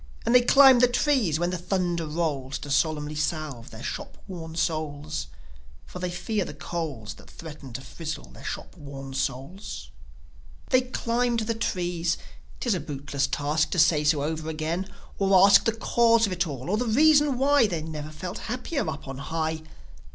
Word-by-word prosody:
And 235 - +2
they 250 - +8
climb 265 0 +7
the 250 - +6
trees 245 - +2
when 175 +2 0
the 180 - -3
thunder 175 -2 -1
rolls, 150 -4 -2
To 145 - -7
solemnly 150 +1 +1
salve 150 -5 -3
their - - -10
shop - - -5
worn 165 -3 -7
souls. 150 - -2 0.6
For 180 - -9
they 180 0 -2
fear 200 +4 -1
the 145 - -8
coals 145 -9 -4
That - - -16
threaten 150 -5 -10
to 135 - -5
frizzle 150 - -7
their 60 - -13
shop - - -6
worn 135 -2 -8
souls. 135 - -4 0.8
They 255 - +6
climbed 240 -1 0
the 225 +1 -1
trees. 175 -6 -1 0.4
'Tis - - +1
a - - -1
bootless 140 -1 -2
task 150 +2 0
To - - -3
say 160 -2 +4
so 150 -1 +2
over 160 +1 -3
again, 165 +5 -3 0.3
or 195 -1 +5
ask 200 0 +7
The 225 - +4
cause 230 0 +3
of 195 - -2
it 175 -1 0
all, 140 +3 -5
or 210 - +2
the 245 +2 -1
reason 295 +3 +5
why 275 -2 +4
They 170 -5 -3
never 155 -1 -6
felt 175 +4 -6
happier 250 - -2
up 145 -2 -6
on 135 0 -6
high. 160 +1 -2
165 Hz, 180 wpm, -26 LUFS, 150-215 Hz, 0.8 s, they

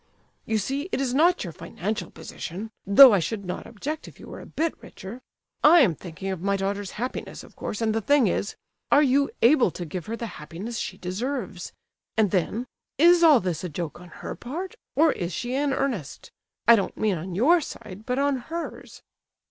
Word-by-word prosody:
You 220 - +1
see, 275 - -2
it - - -1
is 265 -2 -1
not 340 +6 +3
your 175 -4 -6
financial 195 +1 -4
position 200 +7 -7 0.2
(though 240 +5 +10
I 200 - +4
should 200 +5 -3
not 180 - -5
object 290 +8 -5
if - - -14
you - - -11
were - - -8
a - - -11
bit 325 +1 -1
richer)—I 255 - +1
am 205 - +4
thinking 175 +4 -6
of 185 -3 -5
my 200 +1 +1
daughter's 195 0 -3
happiness, 250 +4 -5
of - - -16
course, 210 - -5
and 220 -1 +1
the 225 - 0
thing 280 +3 +4
is—are 205 +8 0
you 280 +1 +3
able 250 -2 +6
to 175 +1 -6
give 175 +1 -6
her 225 - -3
the 235 - -4 0.2
happiness 195 +10 -6
she 190 - -4
deserves? 190 0 -4 0.5
And 210 -4 +3
then—is 255 - +2
all 310 -6 +7
this 180 -5 -3
a 180 - -3
joke 165 +1 -5
on 180 - -12 0.2
her - - -3
part, 340 +10 -6 0.2
or 315 +1 +5
is 175 -6 -4
she 240 +7 -3
in 280 +1 +1
earnest? 250 - -3 0.4
I 235 - +9
don't 200 - -2
mean 205 -6 0
on 175 +2 -6
your 320 - +4
side, 210 -6 -9
but 250 - 0
on 280 -1 +2
hers." 330 +7 -7
225 Hz, 195 wpm, -25 LUFS, 185-275 Hz, 0.5 s, though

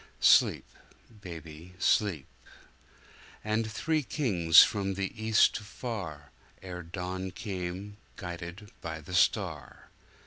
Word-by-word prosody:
Sleep, - - +5 0.6
baby, 85 -1 -10
sleep! 95 -6 +2 1.2
And 110 +1 -1
three 155 +6 0
kings 95 - +5
from 100 -2 -1
the 95 0 -3
East 110 0 +4
afar, 105 - -7 0.3
Ere 90 -1 -6
dawn 90 +2 -5
came, 95 +1 -6 0.2
guided 90 +3 -8
by 80 -1 -5
the 80 +4 -10
star. 85 - 0
95 Hz, 100 wpm, -29 LUFS, 85-105 Hz, 1.2 s, Sleep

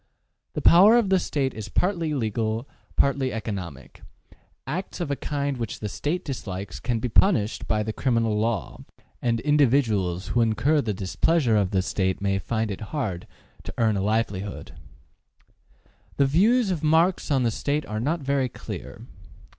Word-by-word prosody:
The - - -4
power 200 +7 +7
of 225 -5 +2
the 190 -1 +4
State 140 -6 -1
is 105 -2 -7
partly 170 - 0
legal, 110 0 -2 0.3
partly 140 -2 +2
economic: 100 - -6 0.6
acts 175 +10 -4
of 170 -5 -2
a - - +1
kind 140 -1 -2
which 115 -3 -4
the 105 - -3
State 155 - -3
dislikes 100 -8 -5
can 120 -2 -1
be 115 - -2
punished 115 - +2
by 105 -1 +1
the 110 +1 -4
criminal 115 -4 +1
law, 110 -3 -2 0.4
and 115 -1 +1
individuals 115 - +2
who 120 - +2
incur 115 +7 +2
the 110 - -2
displeasure 115 - +1
of 100 -3 +2
the 95 -1 +1
State 95 -1 -1
may 100 -1 0
find 110 +1 -2
it 100 - -6
hard 95 - -3 0.3
to - - -8
earn 110 -3 +2
a 95 - -1
livelihood. 105 -1 -2 1.5
The 140 - +4
views 205 - +3
of 170 -5 -2
Marx 165 +4 +2
on 135 -3 +2
the 115 - +2
State 145 +6 -1
are 110 -3 -4
not 155 +8 -1
very 135 -2 0
clear. - - -8
120 Hz, 160 wpm, -25 LUFS, 105-150 Hz, 1.5 s, power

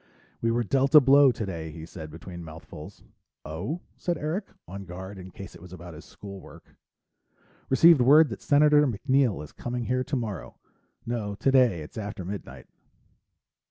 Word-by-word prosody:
"We 115 - +1
were 120 +1 +1
dealt 135 +6 +1
a - - +13
blow 140 0 +6
today," 90 -8 -5
he 80 0 -9
said, 80 -2 -9
between 85 +2 -9
mouthfuls. 80 0 -11 0.4
"Oh?" 100 - -4 0.2
said 175 -1 -2
Eric, 165 +7 -3 0.2
on 100 +2 -8
guard 95 +2 -8
in 95 0 -10
case 100 +2 -10
it 85 - -14
was 90 -1 -13
about 90 -1 -10
his 75 - -12
school 100 -1 -10
work. - - -16 0.9
"Received 150 +2 +6
word 145 +4 +6
that 110 - -7
Senator 150 0 +4
MacNeill 130 - +1
is 75 - -11
coming 120 0 -5
here 130 +2 0
tomorrow. 115 -8 -4 0.5
No, 110 -4 -3
today 125 -7 +3
it's 75 +8 -8
after 100 -3 -6
midnight." 100 +2 -7
110 Hz, 160 wpm, -26 LUFS, 90-135 Hz, 0.9 s, a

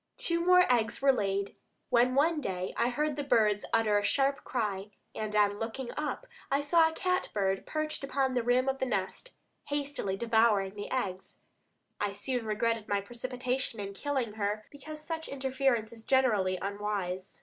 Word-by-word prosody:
Two 335 0 0
more 360 0 +6
eggs 230 -2 +1
were 275 0 +5
laid, 200 -3 -1 0.4
when 250 +1 +4
one 305 +2 +3
day 185 -6 -3
I 235 - +2
heard 295 +3 -1
the 290 - -1
birds 215 -6 +3
utter 215 -2 +3
a - - -4
sharp 275 +4 +1
cry, 205 -4 -2 0.2
and 215 -1 -4
on 205 -1 +3
looking 235 +2 -4
up 300 +11 -3 0.2
I 275 - +2
saw 320 +2 +4
a - - -8
cat 365 +1 0
bird 195 -1 0
perched 310 -2 -2
upon 270 -1 0
the 250 - +1
rim 245 +2 +2
of 270 0 0
the 260 - 0
nest, 205 - -2 0.4
hastily 285 -9 -2
devouring 220 -4 +3
the 205 0 -6
eggs. 195 -8 -3 0.6
I 205 -1 -1
soon 245 +2 -2
regretted 225 0 0
my 205 0 +1
precipitation 250 +2 -3
in 200 -1 -5
killing 265 -2 -2
her, 210 0 -2
because 305 +2 -9
such 320 -1 -4
interference 265 -4 0
is 225 - -10
generally 220 -7 +2
unwise. 200 -2 -3
235 Hz, 170 wpm, -30 LUFS, 205-275 Hz, 0.6 s, more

